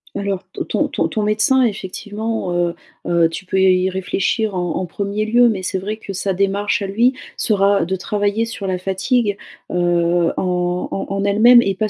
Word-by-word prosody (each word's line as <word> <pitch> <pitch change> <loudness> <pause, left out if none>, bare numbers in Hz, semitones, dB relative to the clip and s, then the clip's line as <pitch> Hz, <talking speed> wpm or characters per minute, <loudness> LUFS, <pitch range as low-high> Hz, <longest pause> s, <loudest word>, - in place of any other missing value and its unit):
Alors, 200 -1 -2
t - - -3
ton - - +1
ton - - 0
ton 215 - -2
médecin 215 +5 +3
effectivement, 210 -1 -3
heu, 175 -1 0 0.3
heu, 170 -1 +3
tu 170 +3 -8
peux 190 0 0
y 185 0 +4
réfléchir 195 +3 -1
en 180 -2 -2
en 185 - -2
1er 200 +4 -3
lieu, 240 +2 +4
mais 195 -4 -2
c'est 185 +1 -2
vrai 210 +3 -4
que 200 -3 -8
sa 195 +1 -1
démarche 200 +1 0
à - - -3
lui 235 +6 +2 0.2
sera 200 -4 +2
de 190 +3 -1
travailler 205 +3 -1
sur 220 -3 -6
la 185 -1 -1
fatigue, 200 +3 0 0.3
heu, 175 -1 +2
en 180 -1 -1
en - - -3
en 195 0 -2
elle-même 235 +4 +6
et 195 - 0
pas 215 +3 -1
195 Hz, 190 wpm, -19 LUFS, 185-215 Hz, 0.3 s, elle-même